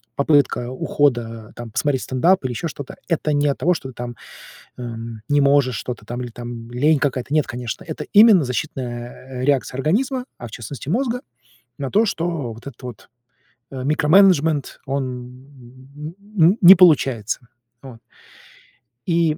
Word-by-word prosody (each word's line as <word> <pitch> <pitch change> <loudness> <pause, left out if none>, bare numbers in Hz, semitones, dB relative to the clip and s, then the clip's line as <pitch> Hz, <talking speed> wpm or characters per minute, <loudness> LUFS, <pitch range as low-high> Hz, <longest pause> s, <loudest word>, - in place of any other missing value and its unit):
попытка 140 -4 +2
ухода- 120 -5 -1
там 120 -2 -8
посмотреть 135 +2 0
стендап, 170 +8 +2
или 125 - -1
еще 165 +8 -3
что-то- 145 -2 -8
это 155 -3 0
не 145 0 +2
от 140 - 0
того, 175 +7 +2
что 135 -5 -6
ты 125 - -13
там, 120 0 -6 0.6
эм, 115 -2 -7
не 145 0 +3
можешь 140 -4 +3
что-то, 120 -4 -6
там, 120 +1 -5
или 120 - -6
там 120 0 -8
лень 145 +4 +3
какая-то. 135 -1 -2
Нет, 155 - +2
конечно, 120 -2 -6
это - - -6
именно 210 -5 +7
защитная, 125 -1 -5
э, - - -1
реакция 135 -2 0
организма, 250 - 0
а 120 - -7
в - - -15
частности 125 +5 -8
мозга, 245 - 0 0.6
на 135 -2 -4
то, 215 +3 +4
что 165 - -2
вот 115 +5 -12
этот 135 -1 -11
вот, 120 -6 -9 0.6
э, 130 -1 -5
микроменеджмент- 155 0 +3
он 135 0 -1 1.3
н 175 +7 +5
не 185 0 +10
получается. 135 - +3 0.4
Вот. 125 -4 -11 1.1
И 165 -2 +2
135 Hz, 155 wpm, -21 LUFS, 120-160 Hz, 1.3 s, не